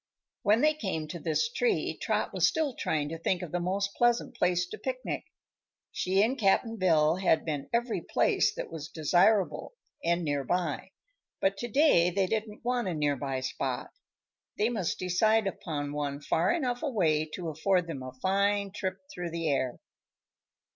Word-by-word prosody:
When 215 Hz, +3 st, +3 dB
they 305 Hz, 0 st, +4 dB
came 190 Hz, -, -3 dB
to 170 Hz, -, -5 dB
this 165 Hz, -, +1 dB
tree 480 Hz, -1 st, 0 dB
Trot -, -, 0 dB
was -, -, +4 dB
still 310 Hz, -4 st, 0 dB
trying 150 Hz, -8 st, -1 dB
to 165 Hz, +1 st, -6 dB
think 180 Hz, +2 st, 0 dB
of 170 Hz, -, -7 dB
the 175 Hz, -, -1 dB
most 195 Hz, +3 st, -1 dB
pleasant 240 Hz, +1 st, +1 dB
place 180 Hz, -4 st, +2 dB
to 435 Hz, -, -7 dB
picnic. -, -, -4 dB, 0.7 s
She 190 Hz, +2 st, +2 dB
and 255 Hz, +5 st, 0 dB
Cap'n 225 Hz, +2 st, +2 dB
Bill 165 Hz, -4 st, +3 dB
had 185 Hz, -4 st, +2 dB
been 145 Hz, -3 st, -3 dB
every 235 Hz, 0 st, 0 dB
place -, -, +2 dB
that -, -, -5 dB
was 155 Hz, -2 st, -6 dB
desirable 180 Hz, -, +2 dB, 0.3 s
and 170 Hz, +1 st, +1 dB
near 145 Hz, -3 st, -1 dB
by, 180 Hz, +6 st, -1 dB, 0.5 s
but 195 Hz, +1 st, +2 dB
to 240 Hz, -, -4 dB
day 235 Hz, -, +4 dB
they 190 Hz, +2 st, +1 dB
didn't 215 Hz, +2 st, -3 dB
want 245 Hz, -3 st, 0 dB
a 180 Hz, -, -1 dB
near 145 Hz, -2 st, +1 dB
by 135 Hz, -1 st, -3 dB
spot. 130 Hz, -, -3 dB, 0.7 s
They 215 Hz, +2 st, +2 dB
must 210 Hz, -8 st, -1 dB
decide 215 Hz, +5 st, +2 dB
upon 145 Hz, -6 st, -3 dB
one 145 Hz, -1 st, -2 dB
far 165 Hz, +5 st, +1 dB
enough 250 Hz, -7 st, -1 dB
away 170 Hz, -, +1 dB
to 175 Hz, -3 st, -4 dB
afford 180 Hz, +3 st, +1 dB
them 160 Hz, -6 st, -6 dB
a 130 Hz, 0 st, -6 dB
fine 200 Hz, +7 st, +1 dB
trip 190 Hz, -1 st, -3 dB, 0.2 s
through 175 Hz, -1 st, -4 dB
the 165 Hz, -1 st, -2 dB
air. 130 Hz, -3 st, 0 dB
185 Hz, 175 wpm, -29 LUFS, 160-220 Hz, 0.7 s, they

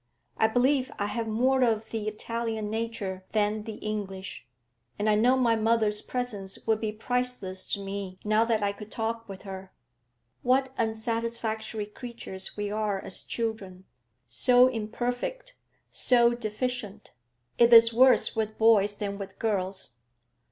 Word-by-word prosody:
I 220 Hz, -, +3 dB
believe 255 Hz, +3 st, +2 dB
I 205 Hz, -, -1 dB
have 225 Hz, +2 st, -3 dB
more 255 Hz, +4 st, +2 dB
of 225 Hz, -2 st, 0 dB
the 220 Hz, -2 st, -3 dB
Italian 220 Hz, 0 st, -3 dB
nature 220 Hz, -4 st, -3 dB
than 210 Hz, 0 st, +1 dB
the 220 Hz, -2 st, -6 dB
English, 195 Hz, -6 st, -5 dB, 0.5 s
and 210 Hz, -, -1 dB
I 215 Hz, -, +5 dB
know 245 Hz, +5 st, +4 dB
my 235 Hz, -3 st, +3 dB
mother's 220 Hz, -1 st, +2 dB
presence 210 Hz, -6 st, -4 dB
would 220 Hz, -1 st, +1 dB
be 215 Hz, -1 st, -1 dB
priceless 225 Hz, -4 st, -2 dB
to -, -, 0 dB
me 195 Hz, -1 st, -5 dB
now 215 Hz, +1 st, +4 dB
that 225 Hz, -2 st, +1 dB
I 200 Hz, -, +2 dB
could 210 Hz, +1 st, -10 dB
talk 230 Hz, 0 st, -3 dB
with 195 Hz, -1 st, -9 dB
her. 190 Hz, -1 st, -8 dB, 0.7 s
What 260 Hz, +1 st, +2 dB
unsatisfactory 225 Hz, -1 st, -2 dB
creatures 210 Hz, -4 st, -6 dB
we 205 Hz, 0 st, -2 dB
are 210 Hz, -2 st, -1 dB
as 190 Hz, -, -3 dB
children, 200 Hz, -5 st, -4 dB, 0.4 s
so 250 Hz, 0 st, +5 dB
imperfect, 245 Hz, -, -3 dB, 0.4 s
so 240 Hz, -2 st, +4 dB
deficient! 220 Hz, -2 st, -4 dB, 0.5 s
It 235 Hz, 0 st, +6 dB
is 230 Hz, 0 st, +8 dB
worse 255 Hz, +1 st, +5 dB
with 215 Hz, -1 st, -2 dB
boys 210 Hz, -2 st, +4 dB
than 200 Hz, -1 st, -4 dB
with 195 Hz, -1 st, -8 dB
girls. 190 Hz, -, -2 dB
220 Hz, 145 wpm, -28 LUFS, 205-235 Hz, 0.7 s, is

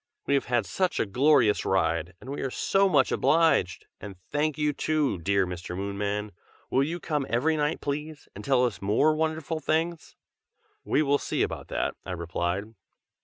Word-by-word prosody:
"We -, -, +1 dB
have 140 Hz, -, +2 dB
had 120 Hz, -4 st, +1 dB
such 185 Hz, -, -1 dB
a -, -, +2 dB
glorious 125 Hz, 0 st, +3 dB
ride, 85 Hz, -2 st, 0 dB
and 130 Hz, -, -9 dB
we 145 Hz, -, -4 dB
are 135 Hz, -, -1 dB
so 195 Hz, +8 st, +2 dB
much 145 Hz, -6 st, +3 dB
obliged! 140 Hz, -, +2 dB
and 100 Hz, -2 st, -8 dB, 0.2 s
thank 150 Hz, 0 st, 0 dB
you 150 Hz, -1 st, +1 dB
too, 150 Hz, -, 0 dB
dear 95 Hz, +3 st, +1 dB
Mr. 90 Hz, 0 st, -6 dB
Moonman! 100 Hz, +1 st, -3 dB, 0.4 s
will 130 Hz, -, +3 dB
you 165 Hz, +5 st, -1 dB
come 150 Hz, -4 st, -2 dB
every 150 Hz, +7 st, +2 dB
night, 150 Hz, +1 st, -1 dB
please, 150 Hz, +1 st, -4 dB
and -, -, -9 dB
tell 130 Hz, -3 st, +3 dB
us 120 Hz, -, -3 dB
more 110 Hz, +11 st, +3 dB
wonderful 160 Hz, 0 st, -2 dB
things?" 160 Hz, +2 st, -2 dB, 0.7 s
"We 155 Hz, -, +2 dB
will 145 Hz, 0 st, +2 dB
see -, -, -1 dB
about -, -, -4 dB
that!" -, -, -1 dB
I 95 Hz, -, -5 dB
replied. 85 Hz, +5 st, -3 dB
135 Hz, 175 wpm, -27 LUFS, 100-155 Hz, 0.7 s, glorious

